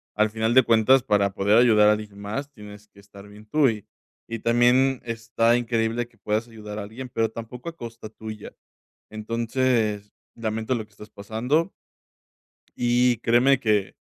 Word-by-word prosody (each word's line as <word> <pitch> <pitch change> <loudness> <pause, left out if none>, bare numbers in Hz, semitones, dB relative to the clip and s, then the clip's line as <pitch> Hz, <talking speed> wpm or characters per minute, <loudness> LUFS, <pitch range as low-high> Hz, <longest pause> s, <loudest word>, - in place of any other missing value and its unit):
Al 105 0 +2
final 110 +2 -1
de 130 - +7
cuentas, 115 +3 +4
para 100 -5 +1
poder 100 +3 +2
ayudar 110 -4 +5
a - - +6
alguien 105 -1 -4
más, 110 +8 -5
tienes 105 -4 -13
que 100 - -21
estar 100 0 -15
bien 105 +1 -15
tú, 140 +4 +3
y 105 -3 -5 0.5
y 115 - -3
también 120 +3 +3
está 115 0 +1
increíble 115 0 -1
que 120 -1 -29
puedas 105 +3 -2
ayudar 105 -2 -9
a 105 - -4
alguien, 120 +5 -9
pero 115 -1 0
tampoco 115 +6 -9
a 165 - -12
costa 115 -5 -9
tuya. 110 -1 -9 0.6
Entonces 115 -1 -1 0.2
lamento 110 +2 -2
lo 110 - -3
que 105 - -27
estás 105 +1 -14
pasando. 115 +11 -1 1.1
Y 120 0 +2
créeme 120 +4 +3
que 105 -5 0
115 Hz, 165 wpm, -24 LUFS, 105-120 Hz, 1.1 s, de